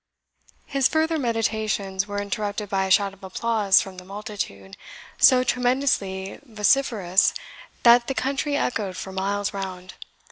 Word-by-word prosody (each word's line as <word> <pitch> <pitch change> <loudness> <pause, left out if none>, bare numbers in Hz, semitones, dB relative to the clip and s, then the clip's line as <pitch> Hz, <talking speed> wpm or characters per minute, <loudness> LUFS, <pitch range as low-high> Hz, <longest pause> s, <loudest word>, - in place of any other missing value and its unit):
His 275 -2 +2
further 320 0 0
meditations 215 -5 -1
were 205 0 -3
interrupted 205 0 -3
by 190 -2 0
a - - -5
shout 195 +1 +3
of 195 +1 -19
applause 205 0 +2
from 190 -1 -9
the - - -12
multitude, 195 - -7 0.4
so 255 -1 +6
tremendously 245 -7 0
vociferous 215 -5 +2 0.5
that 235 0 +6
the 270 - -2
country 280 +2 -1
echoed 205 -9 -2
for 190 - -6
miles 200 +2 -2
round. 190 -2 -6
205 Hz, 135 wpm, -24 LUFS, 190-245 Hz, 0.5 s, so